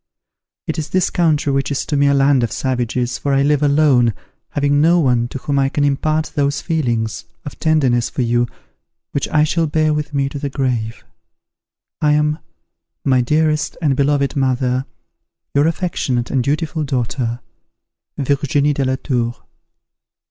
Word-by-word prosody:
It - - -3
is 155 - -4
this 185 -1 +1
country 155 -5 +1
which 135 0 0
is 140 - -2
to 150 - -2
me 140 0 +3
a 140 - +4
land 140 -1 +4
of 120 - -1
savages, 125 -1 -2
for 140 -1 0
I 135 - +3
live 145 0 +2
alone, 140 - +3 0.3
having 145 0 +1
no 170 +3 +4
one 125 -6 +2
to 125 - -6
whom 140 +1 -1
I 135 0 +2
can 145 - -1
impart 155 +2 0
those 140 -2 0
feelings 115 - -2 0.2
of 145 - -8
tenderness 135 -7 +2
for 130 - -2
you 120 0 +1 0.6
which 140 - -1
I 150 -1 +3
shall 165 +1 +1
bear 155 0 +1
with 150 0 -3
me 140 -1 0
to 140 - -6
the 140 - -3
grave. 125 -5 -2 1.0
I 150 -1 +3
am, 150 +1 +1 0.7
"My 130 -2 +3
dearest 155 +3 0
and 145 -5 +1
beloved 140 0 +1
mother, 130 -1 0 0.7
"Your 145 +2 +3
affectionate 150 -8 -1
and 130 -2 +1
dutiful 155 +3 -1
daughter, 125 -2 -2 0.8
"VIRGINIE 145 +1 +1
DE 140 - -1
LA 130 0 0
TOUR." 120 -3 -2
140 Hz, 165 wpm, -18 LUFS, 125-150 Hz, 1.0 s, a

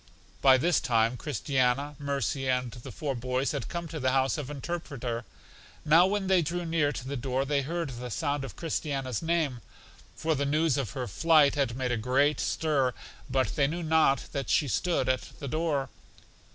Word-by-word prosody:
By 130 -1 +7
this 170 +6 +2
time 115 0 +2
Christiana, 135 +1 0
Mercy 140 -1 -1
and 125 -1 0
the 120 0 -9
four 150 -4 -3
boys 130 +2 -1
had 140 - -3
come 170 -1 -4
to 160 - -5
the 130 -1 +1
house 135 0 +2
of 145 -3 -5
Interpreter. 135 -6 -4 0.6
Now 165 +4 +6
when 200 0 -1
they 190 -1 +4
drew 175 +3 -2
near 160 -3 +1
to 130 -2 -6
the 140 - -3
door 130 +1 -1
they 140 0 +1
heard 165 +1 -3
the 125 0 -6
sound 145 +3 -1
of 120 -8 -7
Christiana's 135 -6 -2
name; 160 -7 0 0.5
for 160 0 0
the 140 -1 -1
news 150 0 +2
of 130 -9 -2
her 130 - -3
flight 155 0 +4
had 135 -5 -1
made 130 -2 -1
a 120 - +1
great 135 +6 +2
stir; 140 -6 +1 0.3
but 130 0 0
they 140 -2 +3
knew 170 +4 -3
not 155 -4 +3
that 135 -3 -3
she 145 - +3
stood 165 0 0
at 130 0 -1
the 140 - -6
door. 150 -2 -1
140 Hz, 190 wpm, -28 LUFS, 130-155 Hz, 0.6 s, By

